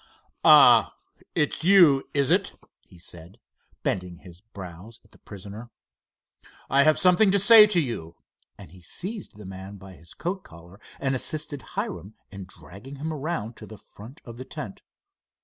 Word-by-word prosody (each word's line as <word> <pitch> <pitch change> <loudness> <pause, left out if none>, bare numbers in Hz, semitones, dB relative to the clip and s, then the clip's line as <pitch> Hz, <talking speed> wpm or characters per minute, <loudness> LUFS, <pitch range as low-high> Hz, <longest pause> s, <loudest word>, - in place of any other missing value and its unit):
"Ah, - - +6 0.4
it's 150 -1 -1
you 170 -7 +5
is 140 -2 0
it?" - - +1 0.3
he 90 - -18
said, 85 +4 -12 0.4
bending 90 -2 -3
his 90 -1 -16
brows 100 0 -12
at 105 - -27
the - - -21
prisoner. 105 +4 -11 1.0
"I 135 +2 +4
have 155 +2 +4
something 185 +3 +4
to 200 - +3
say 215 +2 +8
to 200 -4 +2
you," 115 - -5 0.4
and - - -14
he 90 0 -16
seized 190 - -7
the 105 - -12
man 95 +1 -10
by 95 -1 -13
his 85 -1 -15
coat 180 +4 -4
collar 85 +4 -16 0.2
and 135 -1 -1
assisted 145 +2 -3 0.2
Hiram 195 - -5 0.2
in 95 -1 -9
dragging 100 +8 -13
him 155 +3 -5
around 140 -7 -5
to - - -11
the 110 - -12
front 115 +10 -15
of 115 -2 -11
the 130 - -9
tent. 100 -6 -9
115 Hz, 165 wpm, -25 LUFS, 95-155 Hz, 1.0 s, say